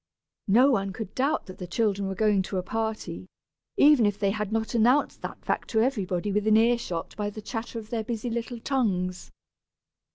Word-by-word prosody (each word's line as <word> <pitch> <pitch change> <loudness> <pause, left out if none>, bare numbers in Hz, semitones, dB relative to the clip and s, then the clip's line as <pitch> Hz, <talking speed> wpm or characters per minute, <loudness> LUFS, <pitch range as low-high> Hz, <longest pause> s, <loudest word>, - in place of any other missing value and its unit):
No 245 +8 +5
one 195 -5 0
could 215 -1 -6
doubt 280 +4 0
that 185 - -11
the 180 - -6
children 200 0 0
were 190 - -3
going 210 -1 +3
to 190 +1 -4
a 180 - -1
party, 220 -5 -4 0.5
even 285 -7 +6
if 205 -1 -1
they 200 -2 +1
had 210 0 -3
not 225 +1 -1
announced 245 +5 +3
that - - -7
fact - - -1
to 220 - +1
everybody 205 -6 -1
within 210 +2 +3
ear 235 +2 +4
shot 170 -7 -5
by 205 -1 -2
the 210 - -8
chatter 225 +2 -5
of 220 -1 -8
their 225 -2 -1
busy 235 +1 -3
little 235 +1 -4
tongues! 190 -9 -1
215 Hz, 195 wpm, -27 LUFS, 195-235 Hz, 0.5 s, even